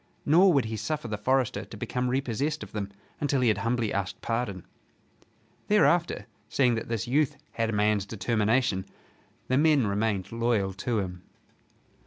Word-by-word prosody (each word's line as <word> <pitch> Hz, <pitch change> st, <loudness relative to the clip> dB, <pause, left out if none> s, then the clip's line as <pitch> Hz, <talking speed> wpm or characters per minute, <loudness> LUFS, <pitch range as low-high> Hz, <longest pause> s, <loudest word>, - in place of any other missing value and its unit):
Nor 180 Hz, +6 st, +6 dB
would 140 Hz, -5 st, +3 dB
he 110 Hz, 0 st, -4 dB
suffer 150 Hz, 0 st, -3 dB
the 105 Hz, -, -2 dB
forester 125 Hz, -2 st, +1 dB
to 105 Hz, +1 st, -11 dB
become 125 Hz, +4 st, -2 dB
repossessed 135 Hz, +4 st, -1 dB
of -, -, -10 dB
them 100 Hz, -2 st, -4 dB, 0.3 s
until 140 Hz, -2 st, +1 dB
he 125 Hz, -, +4 dB
had 105 Hz, -2 st, +1 dB
humbly 115 Hz, 0 st, 0 dB
asked 95 Hz, -2 st, -2 dB
pardon. 115 Hz, -6 st, -3 dB, 1.0 s
Thereafter, 175 Hz, -5 st, +3 dB, 0.2 s
seeing 125 Hz, 0 st, +3 dB
that 115 Hz, -, -3 dB
this 115 Hz, -3 st, -2 dB
youth 145 Hz, +2 st, +1 dB
had 115 Hz, -1 st, -1 dB
a -, -, -2 dB
man's 105 Hz, -1 st, +2 dB
determination, 110 Hz, -1 st, +1 dB, 0.6 s
the 130 Hz, +2 st, +2 dB
men 150 Hz, -5 st, +4 dB
remained 100 Hz, -2 st, -1 dB
loyal 115 Hz, -4 st, 0 dB
to 115 Hz, +4 st, -2 dB
him. 90 Hz, -3 st, -3 dB
115 Hz, 160 wpm, -27 LUFS, 105-135 Hz, 1.0 s, Nor